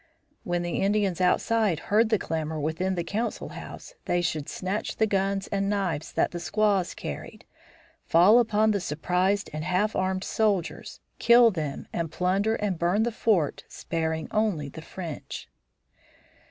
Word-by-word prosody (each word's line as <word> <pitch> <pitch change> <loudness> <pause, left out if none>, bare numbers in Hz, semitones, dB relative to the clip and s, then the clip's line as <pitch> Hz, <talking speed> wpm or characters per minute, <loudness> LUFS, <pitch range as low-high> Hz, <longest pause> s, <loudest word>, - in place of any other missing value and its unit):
When 175 0 -1
the 175 - -2
Indians 195 -3 +1
outside 205 +1 +2 0.2
heard 220 +1 +5
the 220 - +3
clamor 160 -3 -3
within 165 +6 -1
the 175 - -1
council 215 +7 -3
house - - -9
they 175 - +1
should 160 -4 -2
snatch 190 +3 -3
the 220 - +2
guns 195 -1 0
and 195 0 0
knives 190 -7 -1
that - - +1
the 175 - -5
squaws 200 0 +1
carried, - - -7 0.6
fall 185 +8 +6
upon 220 -2 +3
the 205 - +1
surprised 180 +5 0
and 155 0 -4
half 185 +5 0
armed 185 0 0
soldiers, 200 -6 -1 0.2
kill 235 -1 +7
them 155 -6 -4
and 165 -2 -2
plunder 195 +5 +1
and 200 -6 -2
burn 180 +6 +2
the 235 - 0
fort, 205 -9 +1
sparing 160 -1 -3
only 205 -10 0
the 160 - -9
French. 165 -1 -7
190 Hz, 155 wpm, -26 LUFS, 170-210 Hz, 0.6 s, kill